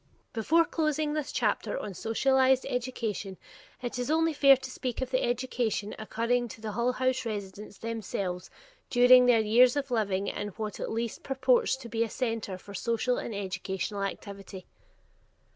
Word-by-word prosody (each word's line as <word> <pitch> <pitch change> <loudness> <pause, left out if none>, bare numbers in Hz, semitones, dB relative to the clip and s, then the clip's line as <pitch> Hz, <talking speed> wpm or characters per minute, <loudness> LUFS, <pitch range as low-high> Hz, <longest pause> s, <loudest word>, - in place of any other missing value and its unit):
Before 320 +9 +3
closing 305 -2 0
this 305 -2 -2
chapter 215 -2 0
on 205 - -5
Socialized 260 +6 +2
Education, 225 -6 -3 0.5
it 245 0 -3
is 245 - -2
only 325 +1 +2
fair 275 -2 +6
to 260 0 -8
speak 255 -2 -4
of 260 -1 -3
the 255 - +2
education 240 -4 -1
accruing 235 +3 0
to 230 - -11
the 215 -1 -5
Hull 240 +3 0
House 255 0 0
residents 205 -2 -6
themselves 200 -5 -4 0.4
during 250 0 +7
their 235 -2 +5
years 240 +4 +5
of 280 -2 -2
living 200 -4 0
in 205 - -3
what 215 -2 -4
at - - -3
least 230 0 -3
purports 455 - +2
to 265 -3 -10
be 230 0 0
a 230 - -3
center 225 -5 -3
for 200 +2 -12
social 235 +4 0
and 225 - -5
educational 190 +1 -3
activity. 195 -1 -6
235 Hz, 160 wpm, -29 LUFS, 210-255 Hz, 0.5 s, during